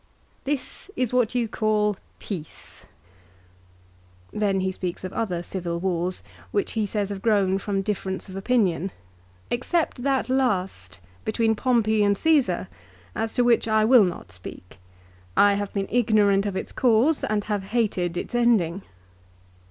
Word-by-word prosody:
This 285 +6 -3
is 255 -2 -1
what 250 -1 +2
you 240 -2 +1
call 215 -2 +1 0.2
peace! 170 -7 -8 0.7
" 90 0 -31
Then 195 -2 +2
he 190 0 0
speaks 180 -1 -5
of 185 - -5
other 180 -7 -2
civil 170 -2 -4
wars, 180 0 -1 0.3
which 405 - -1
he 220 -2 -1
says 205 -1 -2
have 200 -1 -5
grown 195 -3 +2
from 195 -1 -2
difference 190 -2 -3
of 190 - -9
opinion, 195 -4 +1 0.6
"except 265 +2 0
that 270 0 +1
last 190 - 0 0.2
between 225 0 +1
Pompey 220 -3 +2
and 200 0 +3
Csesar 245 - +2 0.5
as 225 - -3
to 245 - +3
which 240 -1 +3
I 220 -1 +3
will 240 -1 +7
not 180 -2 -4
speak. 90 0 -10 0.6
I 205 0 +6
have 200 0 -2
been 195 -1 -2
ignorant 210 -4 +3
of 200 - -3
its - - -4
cause 255 +5 +3
and 210 -1 0
have 205 -2 -2
hated 195 -6 0
its - - -5
ending." 215 -7 +2
205 Hz, 150 wpm, -25 LUFS, 185-230 Hz, 0.7 s, will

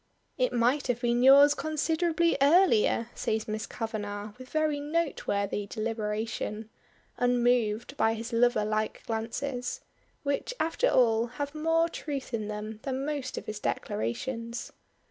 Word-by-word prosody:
"It - - +1
might 245 +5 +2
have 240 -1 -1
been 240 0 +2
yours 280 +3 +8
considerably 325 +2 +1
earlier," 275 - +4
says 220 0 -2
Miss 215 0 -3
Kavanagh 210 -2 -5
with 255 0 -11
very 310 -2 +1
noteworthy 280 - -1
deliberation, 220 0 -3 0.5
unmoved 245 -1 +1
by 225 0 +2
his 230 +2 -6
lover 230 -2 +3
like 215 0 -2
glances, 245 - -3 0.4
which 285 - -2
after 330 +10 +1
all 230 -2 +3
have 285 0 -3
more 325 +2 +2
truth 285 -6 -5
in 215 -2 -2
them 210 +1 -5
than 270 +1 -3
most 285 -3 -3
of - - -5
his 215 0 -5
declarations. 230 - -3
245 Hz, 130 wpm, -29 LUFS, 220-285 Hz, 0.5 s, yours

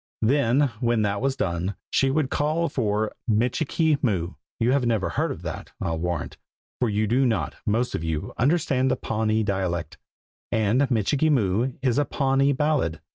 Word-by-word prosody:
Then 135 +2 +3
when 120 -3 +1
that 100 0 -1
was 135 0 0
done, 90 0 -2 0.2
she 135 - +3
would 140 0 0
call 155 +3 0
for 110 -3 -1 0.2
"Michikee 140 +7 +1
Moo." 90 - 0 0.3
You 115 +2 +2
have 140 -1 +2
never 115 -5 +1
heard - - -2
that, - - -7
I'll 80 -1 -2
warrant, 85 -3 -3 0.4
for 125 - +1
you 105 +1 +1
do 120 +6 +2
not, 120 -4 0
most 115 +4 +1
of 80 - -3
you, 80 -2 -3
understand 135 -1 +2
the - - +2
Pawnee 110 0 0
dialect, 95 -4 -2 0.5
and 110 +6 +2
"Michikee 135 +6 +2
Moo" 120 -1 +1
is 125 0 +2
a 145 - +2
Pawnee 135 0 +2
ballad. 140 - 0
120 Hz, 165 wpm, -25 LUFS, 105-135 Hz, 0.5 s, Then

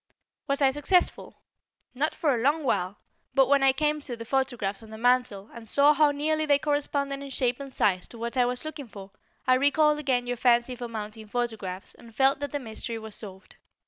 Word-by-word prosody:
Was 275 0 +1
I 265 - +5
successful? 295 +6 0 0.5
Not 290 +5 -1
for 300 -5 +1
a 235 - -1
long 295 +5 +2
while, 195 -6 -1 0.4
but 270 -1 +5
when 280 0 +4
I 270 0 +6
came 300 +2 0
to 245 -4 -4
the 230 - -8
photographs 245 -6 -1
on 220 - -13
the 220 - -9
mantel 245 -4 +1
and 230 -1 -10
saw 285 +6 +5
how 300 0 +4
nearly 310 +2 0
they 285 -1 +5
corresponded 285 -1 -1
in 280 - -7
shape 250 -1 0
and 275 -1 -7
size 185 -7 +1
to 235 - -12
what 235 +2 -4
I 250 -1 +3
was 250 +3 -3
looking 305 -4 -6
for, 200 -2 -11 0.3
I 255 - +4
recalled 300 +3 +3
again 260 -4 0
your 245 0 -3
fancy 240 +1 +2
for 245 0 -6
mounting 215 -1 -6
photographs 210 -5 -4
and 230 -1 -16
felt 270 +2 +3
that 285 -1 -4
the 290 - -1
mystery 230 -2 -5
was 220 -1 -8
solved. 195 -2 -7
255 Hz, 210 wpm, -27 LUFS, 225-285 Hz, 0.5 s, I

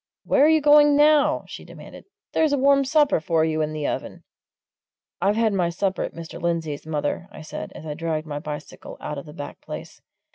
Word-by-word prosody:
Where - - +3
are - - +5
you 315 -1 +4
going 295 0 +6
now?" 300 0 +4
she - - -9
demanded. - - -12 0.3
"There's 315 -2 +2
a - - +2
warm 275 +1 +4
supper 295 - +3
for 160 0 +1
you 155 -1 0
in 155 0 -1
the 155 -1 -4
oven!" - - -4 1.0
"I've 200 +2 +2
had 225 -2 +2
my 180 -3 +1
supper 190 +2 -1
at - - -4
Mr. 165 -1 -8
Lindsey's, 160 -3 -2
mother," 155 +3 -2
I 155 - -10
said, 155 - -7
as - - -10
I 150 - -4
dragged 160 0 -3
my 145 -2 -5
bicycle 150 0 -8
out 150 - -5
of 140 - -11
the 150 - -10
back 145 -3 -8
place. - - -9
170 Hz, 210 wpm, -23 LUFS, -, 1.0 s, going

